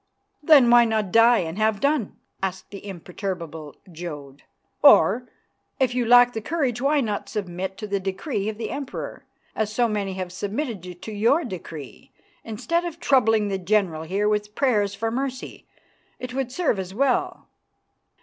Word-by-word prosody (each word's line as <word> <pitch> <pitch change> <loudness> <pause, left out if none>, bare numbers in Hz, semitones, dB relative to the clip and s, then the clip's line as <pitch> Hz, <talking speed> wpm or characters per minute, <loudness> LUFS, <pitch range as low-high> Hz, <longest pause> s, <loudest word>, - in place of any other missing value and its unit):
"Then 285 -5 +6
why 240 0 +8
not 220 -4 -1
die 230 +3 +6
and 165 +3 -5
have 215 -1 +1
done?" 280 -4 0 0.2
asked 190 0 -4
the 200 - -9
imperturbable 170 -4 -6 0.2
Jodd. 150 -5 -8 0.4
"Or, 225 +10 +6 0.5
if 255 -2 +2
you 245 -2 0
lack 245 +1 +7
the 220 - -4
courage, 260 -3 -1
why 285 +2 +2
not 210 -4 -3
submit 190 -2 -4
to 215 - -6
the 200 -1 -1
decree 195 - -3
of 215 - -6
the 225 -1 -4
Emperor, 280 -2 -6 0.3
as 215 -1 -1
so 235 +2 +2
many 205 -3 -2
have 185 -1 -5
submitted 195 - -5
to 220 - -6
your 230 +10 +2
decree, 165 - -9 0.3
instead 330 +10 -2
of 340 -1 -6
troubling 225 -8 +3
the 195 -1 -2
general 185 -4 +1
here 195 +6 -1
with 210 0 -1
prayers 210 -8 +1
for 225 +3 -2
mercy? 260 +1 -5 0.5
It 250 0 -7
would 265 -1 -2
serve 280 - 0
as 190 0 -6
well." 265 +1 0
215 Hz, 160 wpm, -24 LUFS, 190-245 Hz, 0.5 s, why